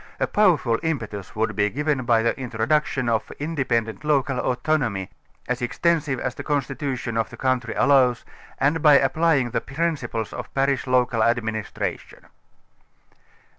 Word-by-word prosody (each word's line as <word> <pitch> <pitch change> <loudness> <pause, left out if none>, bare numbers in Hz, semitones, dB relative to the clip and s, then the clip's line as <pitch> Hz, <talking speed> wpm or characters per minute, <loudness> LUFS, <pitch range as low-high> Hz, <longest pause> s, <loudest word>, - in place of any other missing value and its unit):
A - - +2
powerful 165 - +2
impetus 110 - -4
would 110 0 -1
be 105 -1 +2
given 145 +1 -1
by 115 -2 +3
the 115 - +1
introduction 130 +2 -1
of 115 -2 0
independent 130 -8 -2
local 140 -3 +1
autonomy, 125 -8 -1 0.4
as 125 0 -2
extensive 145 +1 0
as 125 - -2
the - - -8
constitu 140 -1 -2
tion 120 -2 -4
of 115 - 0
the - - -11
country 130 -3 -1
allows, 130 -4 +3 0.3
and 145 +4 +1
by 150 -2 +7
applying 140 -2 +2
the - - -1
principles 140 -8 -3
of - - -7
parish 135 -1 +1
local 125 -2 +2
administration. 110 -2 -2
130 Hz, 140 wpm, -23 LUFS, 115-145 Hz, 0.4 s, by